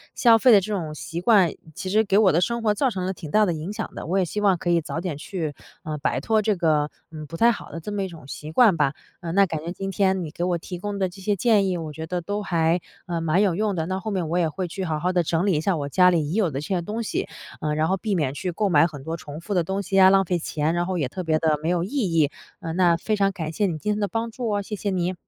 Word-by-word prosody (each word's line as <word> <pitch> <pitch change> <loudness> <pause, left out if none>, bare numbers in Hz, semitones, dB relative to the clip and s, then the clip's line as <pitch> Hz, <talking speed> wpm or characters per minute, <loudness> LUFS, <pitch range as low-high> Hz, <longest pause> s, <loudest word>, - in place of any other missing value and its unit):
消 230 -2 +6
费 250 +2 +5
的 210 - +8
这 210 +2 -4
种 160 -6 -3
习 165 +2 -6
惯， 195 -5 +5 0.2
其 185 - -5
实 215 +3 +3
给 200 -2 +2
我 205 -3 +5
的 170 - +3
生 235 +4 0
活 210 -2 +2
造 265 +5 +1
成 185 -6 -3
了 190 - -1
挺 160 -5 -9
大 215 0 +4
的 175 - 0
影 160 +4 -5
响 210 - -5
的。 - - -6
我 185 +4 0
也 185 - +2
希 190 +6 -4
望 195 -3 +3
可 175 - -3
以 170 -1 +3
早 160 - -4
点 175 -5 -4
去， 155 0 -4 0.3
呃， 155 -1 -4
摆 140 - 0
脱 220 -1 +1
这 210 -1 0
个 155 -3 +1 0.2
嗯， 155 -1 -7
不 165 +3 -8
太 235 +1 +5
好 - - -9
的 165 - -6
这 205 +6 -6
么 200 -1 -1
一 190 - -4
种 165 -6 -12
习 150 +2 -7
惯 210 +2 +5
吧。 145 -3 +1 0.3
呃， 170 - -4
那 200 +3 +5
感 160 -4 -4
觉 170 - -5
今 195 +2 -5
天 190 -1 +1
你 - - -6
给 170 - -4
我 175 -1 +1
提 175 +2 -7
供 200 +2 -4
的 190 - +2
这 190 +2 -12
些 200 +1 0
建 210 -3 +3
议， 180 - -1
我 160 -2 -6
觉 160 +1 -6
得 180 +2 -2
都 205 +4 -3
还， 170 -1 +1 0.3
呃， 170 -1 -2
蛮 165 +4 +2
有 195 -5 +2
用 210 0 0
的。 160 -2 -1
那 185 +1 -2
后 215 +2 -4
面， 180 -4 -1
我 170 +3 -1
也 165 -3 +2
会 185 +3 -4
去 190 +3 -5
好 155 -4 -2
好 180 +2 0
地 175 -1 +2
整 165 +3 0
理 200 - +3
一 150 - +1
下 185 0 +1
我 140 -1 -3
家 180 +5 +5
里 165 -4 +1
已 - - -3
有 195 -5 +1
的 135 - -3
这 150 - -6
些 185 -3 0
东 210 +6 -4
西， 225 - -2 0.3
呃， 150 -1 -1
然 155 +1 +1
后 190 - +2
避 210 0 -2
免 145 -6 0
去 180 +5 -3
购 205 +4 0
买 160 -1 +5
很 145 -4 -10
多 160 +3 -3
重 150 -2 -9
复 200 +5 -5
的 180 -3 +2
东 190 +4 -2
西 195 +1 +1
啊， 190 - +8
浪 195 0 +4
费 180 0 0
钱， 155 0 -1
然 175 0 0
后 185 -1 -1
也 145 - 0
特 185 +8 -6
别 160 -1 +2
地 155 -2 +2
没 160 - -1
有 175 -1 +1
意 185 - -5
义。 165 - +1 0.3
呃， 165 -4 -5
那 175 -2 +3
非 215 +5 -1
常 195 -1 +2
感 165 -5 -5
谢 205 +5 0
你 165 -4 -2
今 210 +7 -2
天 210 - -3
的 205 - 0
帮 225 +4 -3
助 240 +1 -4
哦， 205 -1 0
谢 210 - -5
谢 205 0 -3
你。 180 -1 0
180 Hz, 340 characters per minute, -24 LUFS, 160-200 Hz, 0.3 s, 的